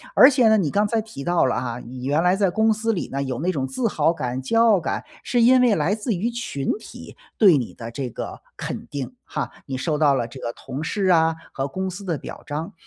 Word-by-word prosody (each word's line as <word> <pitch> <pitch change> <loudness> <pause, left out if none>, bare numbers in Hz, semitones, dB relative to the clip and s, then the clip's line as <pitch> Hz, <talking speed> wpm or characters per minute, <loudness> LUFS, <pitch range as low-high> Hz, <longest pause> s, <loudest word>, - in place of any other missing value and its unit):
而 260 - +9
且 255 -5 +4
呢， 220 - +5
你 165 -8 0
刚 205 +1 +2
才 225 +1 0
提 215 -10 -9
到 175 -1 +2
了 130 - +1
哈， 120 -1 -4
你 125 +1 -9
原 145 +3 +2
来 180 +1 +4
在 195 -2 +2
公 220 +4 +3
司 225 +2 -1
里 195 - -2
呢， 140 - -2
有 130 -3 -3
那 175 +5 0
种 135 -6 -2
自 230 - -1
豪 165 - +2
感、 130 -5 -3
骄 225 - +1
傲 220 -4 +5
感， 170 - -3 0.2
是 245 - +1
因 250 +2 +6
为 240 -4 +4
来 170 +5 +1
自 215 +3 -4 0.2
群 235 -13 -3
体 - - -11 0.2
对 190 -8 +6
你 125 -4 -4
的 115 -1 -8
这 130 +1 -4
个 - - -7 0.2
肯 - - -5
定 130 -3 -6
哈， - - -4 0.2
你 130 - -3
受 150 +3 -1
到 150 -2 +4
了 125 -4 0
这 120 +3 -12
个 115 - -3
同 135 +4 -7
事 195 +4 -1
啊 165 -3 +4 0.2
和 135 - -2
公 190 +5 -3
司 185 +2 -8
的 170 -5 -2
表 - - -9
彰。 155 +6 -4
165 Hz, 265 characters per minute, -23 LUFS, 135-210 Hz, 0.2 s, 而